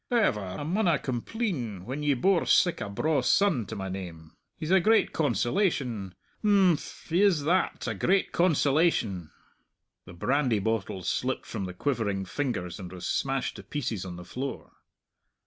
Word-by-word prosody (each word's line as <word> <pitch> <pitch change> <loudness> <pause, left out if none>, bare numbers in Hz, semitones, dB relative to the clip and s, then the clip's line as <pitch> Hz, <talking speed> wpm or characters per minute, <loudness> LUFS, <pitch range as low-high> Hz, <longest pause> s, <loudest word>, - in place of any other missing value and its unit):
However, 225 - +2
I 95 +6 -5
maunna 170 0 +2
compleen 125 - -3
when 135 +4 -4
ye 145 -2 +2
bore 175 +8 +2
sic 175 - +3
a 105 - -3
braw 145 +7 +1
son 145 - +2
to 110 - -6
my 95 -2 -4
name. 85 -4 -7 0.2
He's 155 +2 -4
a 190 - +6
great 220 +5 +3
consolation! 125 - 0 0.3
Imphm, 195 -6 +2
he 170 +4 +2
is 185 -8 +4
that 180 +5 0
a - - 0
great 195 +1 +1
consolation!" 145 - +2 0.8
The - - -11
brandy 125 +5 +1
bottle 100 -3 -2
slipped 130 +9 -1
from 100 -4 -4
the 90 -1 -7
quivering 105 -6 -1
fingers 105 - -3
and 90 -2 -8
was 90 -1 -7
smashed 135 -1 -1
to - - -9
pieces 125 -9 -3
on 90 -2 -6
the 90 0 -9
floor. 135 +2 -5
130 Hz, 160 wpm, -28 LUFS, -, 0.8 s, a